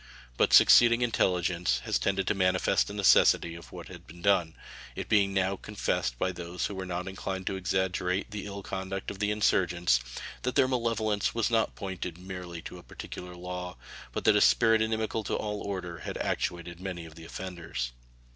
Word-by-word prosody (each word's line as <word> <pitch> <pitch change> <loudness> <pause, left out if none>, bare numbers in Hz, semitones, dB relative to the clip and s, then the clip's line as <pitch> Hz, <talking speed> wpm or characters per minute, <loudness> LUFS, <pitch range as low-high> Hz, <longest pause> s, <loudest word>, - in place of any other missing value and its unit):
But - - +2
succeeding 120 0 +7
intelligence 90 - +1
has - - +1
tended 95 -1 0
to - - +2
manifest 95 -2 +2
the 100 - -6
necessity 95 -4 +5
of 85 -1 -11
what - - -9
has - - -9
been 85 +1 -15
done, 95 -5 +2 0.4
it - - -5
being 100 -2 +3
now 95 0 +1
confessed 60 -13 -2
by 95 - 0
those 90 0 -4
who - - -3
were 95 -1 -5
not 90 +1 -3
inclined 95 0 -4
to 95 - -1
exaggerate 95 +1 -1
the 105 -1 -5
ill 100 0 -7
conduct 95 0 -4
of 95 - -9
the 105 0 +1
insurgents 90 -9 +2 0.4
that 125 - -2
their 130 - +5
malevolence 115 -5 0
was 115 0 +1
not 115 -1 +1
pointed 90 -4 -5
merely 90 -2 -7
to 90 - -8
a - - -14
particular 90 0 -9
law, 90 -2 -6 0.3
but - - -4
that - - +5
a - - +4
spirit 85 - +5
inimical 110 0 -1
to - - -2
all 105 -1 -3
order 90 -4 -5
has - - -6
actuated 85 0 -2
many 90 -3 -5
of 80 - -12
the 80 - -12
offenders. 85 -10 -5
95 Hz, 185 wpm, -29 LUFS, 85-100 Hz, 0.4 s, succeeding